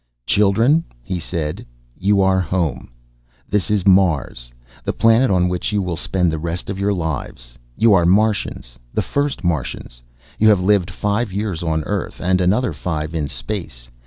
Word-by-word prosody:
"Children," 115 +10 +3 0.2
he 90 +9 -3
said, 80 -3 -3 0.3
"you 100 +1 +2
are 95 0 +3
home. 90 -2 -2 0.6
This 105 0 -1
is 105 -3 +1
Mars, 85 -11 +2 0.3
the - - -2
planet 115 +3 +4
on 90 -2 +3
which 90 +4 -2
you 105 - +1
will 90 -3 -2
spend 90 0 0
the 80 - -3
rest 85 +4 -4
of 95 - -5
your 100 +1 +1
lives. 70 -9 -4 0.2
You 115 -1 +5
are 85 -3 +4
Martians, 100 - 0
the - - -1
first 140 -9 -2
Martians. 65 -7 -3 0.4
You 110 - +5
have 105 -3 +5
lived 95 -1 +2
five 105 +4 -1
years 100 -3 -3
on 80 -2 -1
Earth 100 +2 -4
and 90 +1 +1
another 105 +8 +1
five 80 -2 -4
in 75 -3 -1
space. 70 - -6
90 Hz, 165 wpm, -20 LUFS, 80-105 Hz, 0.6 s, You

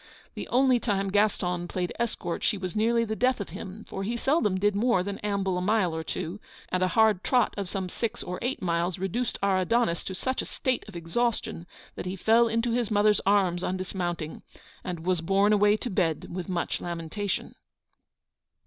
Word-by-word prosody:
The - - -6
only 255 0 +4
time 195 -4 0
Gaston 180 -4 +1
played 180 0 -2
escort 225 -7 -2
she 210 - +2
was 185 -1 -5
nearly 230 +2 +2
the 220 0 -2
death 255 +1 +2
of 200 - -5
him, 200 +4 -8
for 195 - -5
he 230 +5 -2
seldom 235 - +2
did 205 +1 +2
more 220 -3 +3
than 200 +1 -4
amble 195 -3 0
a - - -3
mile 185 -4 +2
or 160 - -3
two, 170 +4 -4 0.3
and 185 - 0
a 185 - +4
hard 215 -2 +3
trot 250 -2 +2
of 200 -3 -4
some 190 -1 -3
six 230 +5 -3
or 180 0 -5
eight 250 -3 -2
miles 170 0 0
reduced 195 +6 -2
our 195 -1 +3
Adonis 185 -2 +1
to 190 - -4
such 260 +7 -1
a - - -6
state 260 -2 -1
of 210 - -11
exhaustion 170 0 -2 0.3
that - - -6
he 185 - -3
fell 225 +5 +4
into 230 +1 0
his 235 -2 0
mother's 210 0 +3
arms 190 -3 +3
on 185 - -1
dismounting, 175 -4 -4 0.4
and 175 -3 -4
was 180 -3 +1
borne 195 +4 +3
away 210 0 +4
to 245 - -4
bed 165 -5 0
with 180 +1 -4
much 175 -2 -1
lamentation. 175 +4 -3
200 Hz, 195 wpm, -27 LUFS, 180-225 Hz, 0.4 s, only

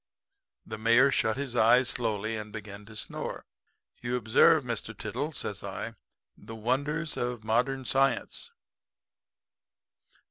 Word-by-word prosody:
"The - - -7
Mayor 115 +5 +5
shut 110 -3 +1
his 135 -3 -4
eyes 120 +2 +5
slowly 110 -2 -1
and 105 -1 -6
began 105 -1 -8
to 110 0 -13
snore. - - -4 0.6
"'You 120 +1 -1
observe, 130 +7 +5
Mr. 120 -3 -4
Tiddle,' - - -3
says - - -4
I, - - -5 0.4
'the 115 - -10
wonders 145 +8 -1
of 120 -2 -2
modern 125 +4 0
science.' 135 - +1
120 Hz, 120 wpm, -29 LUFS, 110-135 Hz, 0.6 s, Mayor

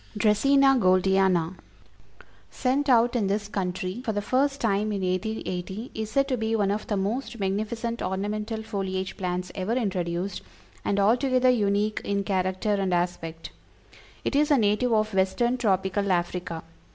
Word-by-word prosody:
_ - - -5
DRACÆNA 270 +5 +4
GOLDIANA. 185 -2 +3 1.0
Sent 275 +2 0
out 240 0 +4
in 215 -5 +1
this 205 +1 -1
country 185 +2 -3
for 220 - -1
the 205 - -1
first 275 +5 +1
time 215 -1 +1
in 200 -2 -2
1880, 185 +2 -3
is 220 -1 -4
said 275 +5 +2
to 265 - 0
be 225 0 0
"one 200 -2 +1
of 210 +1 -3
the 205 - -1
most 230 +5 -2
magnificent 220 +4 -2
ornamental 210 +4 -3
foliage 190 -3 -3
plants 180 -1 -3
ever 190 +3 -2
introduced, 185 -5 -2 0.4
and 200 - 0
altogether 255 +4 +3
unique 210 -2 +1
in 200 0 -1
character 190 +1 0
and 195 -3 +1
aspect. 165 -2 -3 0.7
It - - -1
is 295 +2 +3
a 290 - +5
native 215 +2 +2
of 215 -1 +1
Western 215 +6 +1
Tropical 195 -2 +1
Africa. 175 -1 -2
205 Hz, 150 wpm, -26 LUFS, 190-230 Hz, 1.0 s, a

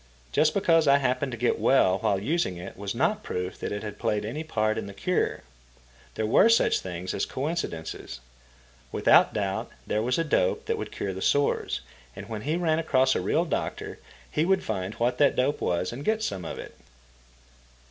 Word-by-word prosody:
Just 155 - +3
because 165 -5 +3
I 140 0 +7
happened 130 0 0
to 115 - -5
get 120 +2 +1
well 95 -8 +4
while 100 -3 +1
using 115 - -1
it 85 - -8
was 100 +2 -5
not 210 - +1
proof 90 - -4
that - - -4
it 105 0 -4
had 105 -1 -7
played 105 -1 0
any 140 +9 -4
part 110 -8 0
in - - -6
the 100 - -9
cure. 180 - 0 0.7
There 110 - -1
were 115 - +5
such 230 - +4
things 90 0 -5
as - - -1
coincidences. 130 - -4 0.7
Without - - +5
doubt - - -2 0.2
there 105 - 0
was 125 +3 0
a 165 - +2
dope 115 - +1
that - - -1
would - - -5
cure 95 - -3
the 95 - -7
sores, 145 +6 +1 0.3
and - - -8
when 110 -2 -5
he 150 +7 -1
ran 165 -2 +1
across 130 -5 +3
a - - -1
real - - +1
doctor - - -3 0.3
he 150 - +1
would 190 +2 +2
find 95 -1 -3
what 125 +1 0
that 145 -2 +4
dope 140 +3 +1
was 90 +4 -1
and 135 +4 -6
get 220 +3 0
some 95 - -3
of - - -5
it. - - -9
125 Hz, 200 wpm, -27 LUFS, 100-155 Hz, 0.7 s, I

